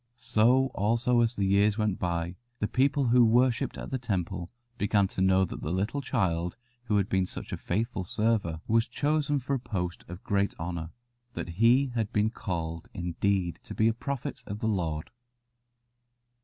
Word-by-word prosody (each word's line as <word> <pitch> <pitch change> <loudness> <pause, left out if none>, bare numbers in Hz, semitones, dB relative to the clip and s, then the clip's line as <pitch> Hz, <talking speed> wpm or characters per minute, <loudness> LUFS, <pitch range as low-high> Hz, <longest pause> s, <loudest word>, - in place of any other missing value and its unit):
So 125 +2 +3
also 120 +4 +2
as 115 +1 +2
the 100 - 0
years 100 +2 +3
went 105 -4 0
by 85 0 -2 0.2
the 105 - -1
people 135 +1 +2
who 125 +1 +6
worshipped 120 +1 +3
at - - -7
the 130 - -1
Temple 90 -6 -2 0.3
began 100 -1 +3
to 95 - -4
know 95 0 +4
that - - -7
the - - -3
little 105 +10 -1
child 90 -9 -1 0.3
who 105 -3 +2
had 100 -1 +1
been 95 -1 +1
such - - -7
a - - -1
faithful 110 +1 -2
server 100 -5 0
was 115 +1 +3
chosen 145 +2 0
for 135 +1 -2
a 135 - +1
post 90 -7 -4
of 90 +3 -9
great 100 0 0
honour 85 -1 -4 0.4
that - - -5
he 120 +9 +4
had 115 -2 -1
been 105 0 +2
called, 85 -7 -4
indeed, 90 +1 -1
to - - -9
be 110 - +3
a 115 - +3
prophet 135 +3 -4
of 100 - -4
the 110 - -2
Lord. 85 -7 -1
105 Hz, 180 wpm, -28 LUFS, 90-120 Hz, 0.4 s, who